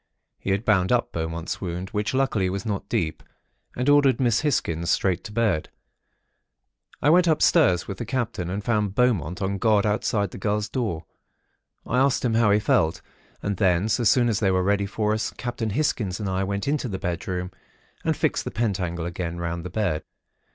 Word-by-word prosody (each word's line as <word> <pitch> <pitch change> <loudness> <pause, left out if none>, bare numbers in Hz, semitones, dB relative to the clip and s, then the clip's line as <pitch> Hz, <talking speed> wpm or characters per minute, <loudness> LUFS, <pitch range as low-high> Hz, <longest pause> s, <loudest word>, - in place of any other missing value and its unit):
He - - -5
had 100 +4 0
bound 95 -4 +3
up 125 -1 +1
Beaumont's 80 0 -4
wound, 90 0 -4
which, 105 +3 -1
luckily, 110 -8 +1
was 95 +1 -4
not 105 -3 -3
deep, 80 -2 -1 0.5
and 125 +2 -2
ordered 145 -4 +5
Miss 120 -4 +2
Hisgins 85 - 0
straight 90 0 +1
to 110 - -7
bed. 105 -8 0 1.3
I 145 - +5
went 175 +1 +5
upstairs 155 - +3
with 95 -1 -6
the 120 - -3
Captain 115 -9 -2
and 100 +2 -3
found 105 -4 0
Beaumont 100 -8 +1
on 100 +1 -1
guard 105 -1 +3
outside 105 -2 0
the - - -9
girl's 105 +2 0
door. 105 -11 -2 0.8
I 125 - +1
asked 135 -1 +2
him 120 - +1
how 115 -1 +4
he 105 +1 +4
felt; 80 -5 +1 0.4
and 100 -2 -1
then, 90 +1 +2
so 120 - +1
soon 120 +3 +4
as 110 -4 +1
they 100 - +2
were 95 -1 +2
ready 100 +1 +1
for 105 +1 0
us, 110 0 -1
Captain 120 -2 -3
Hisgins 105 -6 -1
and 105 - -3
I 95 0 0
went 100 +3 -3
into 145 -2 0
the 95 -5 -3
bedroom 90 +1 -3 0.5
and - - 0
fixed - - 0
the - - -4
pentacle 90 -7 -2
again 85 0 -4
round 85 0 -3
the 90 - -5
bed. 90 -5 -1
100 Hz, 190 wpm, -24 LUFS, 90-115 Hz, 1.3 s, ordered